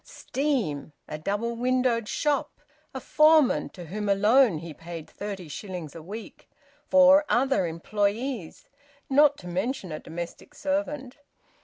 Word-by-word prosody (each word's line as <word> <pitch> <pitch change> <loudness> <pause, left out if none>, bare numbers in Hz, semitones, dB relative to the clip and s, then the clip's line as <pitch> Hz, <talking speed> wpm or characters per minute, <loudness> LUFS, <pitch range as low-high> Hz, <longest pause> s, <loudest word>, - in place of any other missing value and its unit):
Steam! 235 - -2
A 155 - -6
double 205 +8 -2
windowed 250 -2 +1
shop! 295 -2 -1 0.3
A - - -5
foreman 305 -3 +4
to 175 - -10
whom 205 +5 -4
alone 210 +1 +4
he 165 0 -8
paid 165 0 -9
thirty 200 -4 -7
shillings 175 -1 -7
a 165 - -9
week! 210 +7 -10 0.4
Four 280 +1 +7
other 265 -7 +2
employees! 205 +4 -2 0.4
(Not 290 +1 +5
to 180 - -11
mention 190 - -3
a 155 - -4
domestic 170 - -8
servant.) 285 -3 -3
215 Hz, 130 wpm, -26 LUFS, 175-270 Hz, 0.4 s, Four